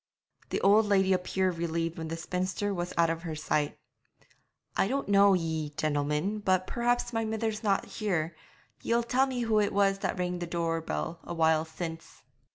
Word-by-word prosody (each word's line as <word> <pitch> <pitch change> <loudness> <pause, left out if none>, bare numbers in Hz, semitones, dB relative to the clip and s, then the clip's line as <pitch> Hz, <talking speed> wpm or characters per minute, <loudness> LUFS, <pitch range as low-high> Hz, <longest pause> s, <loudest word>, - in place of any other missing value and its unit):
The - - -1
old 210 +2 +5
lady 190 -2 +3
appeared 185 -1 0
relieved 165 0 -2
when 160 - -4
the 165 +1 -4
spinster 185 +4 -2
was 175 -1 -3
out 165 -1 +4
of 165 0 -4
her 165 -2 -5
sight. 150 -1 -1 1.0
'I - - +2
don't 275 +5 -1
know 200 -1 +6
ye, 160 -4 -2
gentlemen, 150 +7 0
but 185 -2 +1
perhaps 240 +2 0
now 225 - +1
my 225 - -1
mither's 220 0 -2
not 200 -4 +1
here, 175 -6 -2 0.5
ye'll 235 +1 +1
tell 255 +3 +2
me 255 -2 -2
who 225 -2 +2
it 205 -1 +1
was 195 -1 +2
that - - -2
rang 180 0 -2
the 175 - -4
door 165 -1 -1
bell 165 +1 -4
a 170 - -6
while 160 -1 +3
since.' 165 0 -7
180 Hz, 185 wpm, -29 LUFS, 165-205 Hz, 1.0 s, know